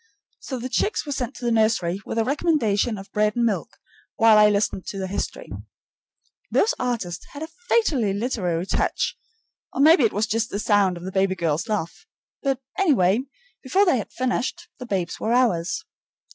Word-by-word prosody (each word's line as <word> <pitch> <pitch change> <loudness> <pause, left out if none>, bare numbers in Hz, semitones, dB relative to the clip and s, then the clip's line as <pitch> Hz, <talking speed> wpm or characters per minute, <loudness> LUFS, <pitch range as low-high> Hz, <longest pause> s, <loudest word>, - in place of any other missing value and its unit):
So 260 - -5
the 245 +1 -4
chicks 405 +10 0
were 290 - -5
sent 265 -2 -3
to 245 - -7
the 235 - +1
nursery, 215 -5 +1
with - - -4
a 225 - +3
recommendation 245 -7 +1
of 195 0 -11
bread 210 0 +1
and 240 -1 +2
milk, 220 -3 -2 0.4
while 225 -3 +6
I 210 0 +7
listened 200 -2 -1
to 200 - -5
their 190 - -2
history. 195 - -5 1.0
Those 450 +4 +2
artists 230 -9 -2
had 290 +2 -6
a 320 - -6 0.2
fatally 280 - +2
literary 195 -6 -1
touch, - - -1 0.6
or - - -6
maybe 310 0 +6
it 225 - +3
was 210 +2 0
just 225 +1 -1
the - - -3
sound 205 -3 +2
of 175 - -10
the 190 - -5
baby 190 0 +1
girl's 165 +5 -1
laugh, 210 - -3 0.3
but, 270 -2 0 0.2
anyway, 230 - +3 0.4
before 380 +10 +2
they 310 -10 +3
had - - -7
finished, 255 +7 -2
the 250 - -7
babes 185 -5 -2
were 225 - 0
ours. 220 -9 +1
225 Hz, 185 wpm, -23 LUFS, 195-260 Hz, 1.0 s, I